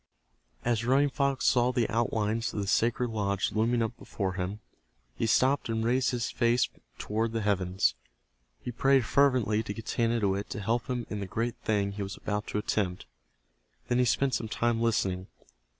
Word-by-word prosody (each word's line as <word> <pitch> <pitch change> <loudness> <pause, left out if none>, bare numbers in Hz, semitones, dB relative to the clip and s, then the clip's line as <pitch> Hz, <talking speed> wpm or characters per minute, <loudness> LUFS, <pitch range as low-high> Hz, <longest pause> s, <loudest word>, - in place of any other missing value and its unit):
As 115 -2 +1
Running 135 +4 +3
Fox 140 -1 0
saw 125 0 +4
the 120 -2 +1
outlines 115 0 0
of - - -1
the 100 - -1
sacred 115 +4 +1
lodge 100 -2 -1
looming 115 +2 +1
up 115 +1 -3
before 95 -3 -3
him, 95 +3 -3 0.5
he 115 - -1
stopped 130 +3 +2
and 110 0 0
raised 125 0 +2
his 120 -2 -2
face 120 +1 +2 0.3
toward 110 +2 -2
the 115 - -1
heavens. 95 -2 +1 0.7
He 125 - -5
prayed 135 +1 +3
fervently 125 -6 +3
to 105 -2 -5
Getanittowit 110 -3 0
to - - -4
help 115 +4 -1
him 125 -3 -2
in 105 - -3
the 100 - -4
great 115 +4 -2
thing 105 -4 0
he 100 +1 -6
was 100 0 -5
about 105 0 -3
to - - -3
attempt. 100 -3 -1 0.8
Then 120 0 +2
he 125 - +4
spent 135 +2 +1
some 110 - -1
time 115 +1 0
listening. 95 -5 0
115 Hz, 175 wpm, -29 LUFS, 105-120 Hz, 0.8 s, saw